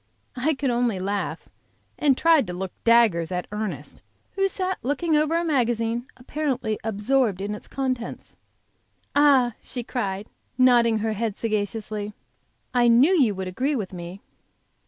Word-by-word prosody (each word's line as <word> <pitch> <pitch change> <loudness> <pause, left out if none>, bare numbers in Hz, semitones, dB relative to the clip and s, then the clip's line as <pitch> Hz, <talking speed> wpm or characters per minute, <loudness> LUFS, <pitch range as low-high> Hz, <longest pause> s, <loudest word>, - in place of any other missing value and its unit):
I 280 +5 0
could 270 -1 -1
only 235 -5 0
laugh 200 +2 -3 0.5
and 275 -3 +3
try 330 -2 +5
to 180 -7 -5
look 185 +1 -4
daggers 225 -8 +4
at 180 0 -2
Ernest, 200 -10 -5 0.3
who 390 0 +1
sat 375 -1 -2
looking 295 +6 0
over 305 +2 +2
a 340 - 0
magazine, 240 -4 0
apparently 250 -5 -2
absorbed 220 0 +1
in 200 +2 -3
its 210 - -9
contents. 255 -3 -4 0.8
"Ah!" 275 -5 +5
she 245 - -6
cried, 205 -5 -3 0.3
nodding 240 -3 +5
her 220 - 0
head 215 -1 -2
sagaciously, 210 -1 -3 0.6
"I 245 -1 +4
knew 250 +10 +6
you 245 - +3
would 190 0 -4
agree 260 +11 -1
with 205 -6 -4
me." 175 +2 -8
235 Hz, 145 wpm, -24 LUFS, 205-270 Hz, 0.8 s, knew